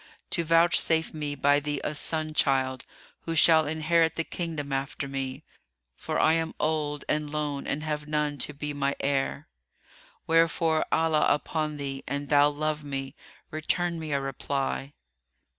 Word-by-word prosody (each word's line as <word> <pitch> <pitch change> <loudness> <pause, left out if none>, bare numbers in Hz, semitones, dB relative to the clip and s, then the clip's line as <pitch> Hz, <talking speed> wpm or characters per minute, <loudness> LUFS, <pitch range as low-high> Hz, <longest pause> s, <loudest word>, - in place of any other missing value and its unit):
to 170 - 0
vouchsafe 165 0 +3
me 150 -2 -3
by 145 +1 +3
thee 145 -1 -3
a - - -2
son 155 +1 0
child, 130 -3 +1 0.4
who 165 - -2
shall 160 -1 +6
inherit 160 +1 +2
the 165 - -1
kingdom 160 -5 -4
after 140 +1 -3
me; 135 -1 -4 0.5
for - - -3
I 155 - +5
am 165 0 -1
old 150 -2 -1
and 150 -1 0
lone 145 -2 -3
and 150 +2 -2
have 150 -1 -3
none 150 -1 -1
to 140 - 0
be 150 0 -5
my 140 -1 0
heir. 140 +2 -1 0.8
Wherefore, 165 -1 +2
Allah 160 -1 +3
upon 150 0 -1
thee, 135 -1 -5
an 145 0 -2
thou 145 0 +5
love 150 +1 -2
me, 135 -1 -4 0.4
return 170 +2 -1
me 155 -1 -5
a 140 - +1
reply." 135 0 -3
150 Hz, 155 wpm, -27 LUFS, 140-160 Hz, 0.8 s, shall